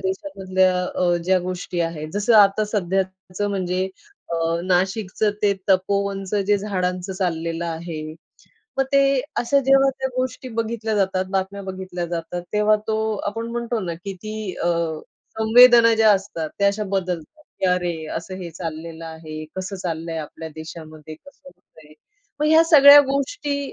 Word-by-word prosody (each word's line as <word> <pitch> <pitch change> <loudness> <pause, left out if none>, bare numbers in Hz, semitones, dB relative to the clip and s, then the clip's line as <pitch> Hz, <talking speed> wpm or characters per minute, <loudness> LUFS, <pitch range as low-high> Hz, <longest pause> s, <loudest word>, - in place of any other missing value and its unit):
देशामध्ये 190 0 -1
अ, 180 -1 +1
ज्या 185 +1 +3
गोष्टी 180 -1 -4
आहेत. 160 -2 -3
जसं 205 +3 +2
आता 205 +1 +5
सध्याचं 190 -1 -2
म्हणजे 185 -1 -1 0.4
अ, - - 0 0.3
नाशिकचं 190 +3 0
ते 205 -1 +4 0.2
तपोवनचं 195 +1 0
जे 205 0 +4
झाडांचं 185 -2 -2
चाललेलं 170 -3 -2
आहे. 165 -1 -5 0.8
मग 270 - +3
ते 275 - +6 0.4
जेव्हा 270 +1 +4
त्या 265 0 -1
गोष्टी 255 +1 -3
बघितल्या 225 -1 -2
जातात, 190 -2 +1
बातम्या 195 +1 -2
बघितल्या 185 -2 -5
जातात 170 +1 -4
तेव्हा 210 0 +3
तो 220 - 0 0.3
आपण 225 +3 -3
म्हणतो 235 0 -2
ना, 175 -4 -4
की 190 +4 -7
ती 215 -3 -5
अ, - - 0 0.7
संवेदना 230 +1 +7
ज्या 220 -1 +5
असतात 190 -5 -2
त्या 200 - +3
अशा 205 +1 -2
बदलतात. 190 - -4 0.2
की - - +2
अरे, 180 -1 0 0.2
असं 170 +3 -6
हे 175 -2 -7
चाललेलं 165 0 -7
आहे, 160 -1 -8
कसं 190 +1 -4
चाललंय 165 -2 -4
आपल्या 160 +1 -7
देशामध्ये 155 -1 -9
कसं 280 - -19
होतय, 155 - -20 0.5
मग 300 - +2
ह्या 320 +1 +6
सगळ्या 290 -3 +9
गोष्टी 280 +1 -2
190 Hz, 145 wpm, -22 LUFS, 175-215 Hz, 0.8 s, सगळ्या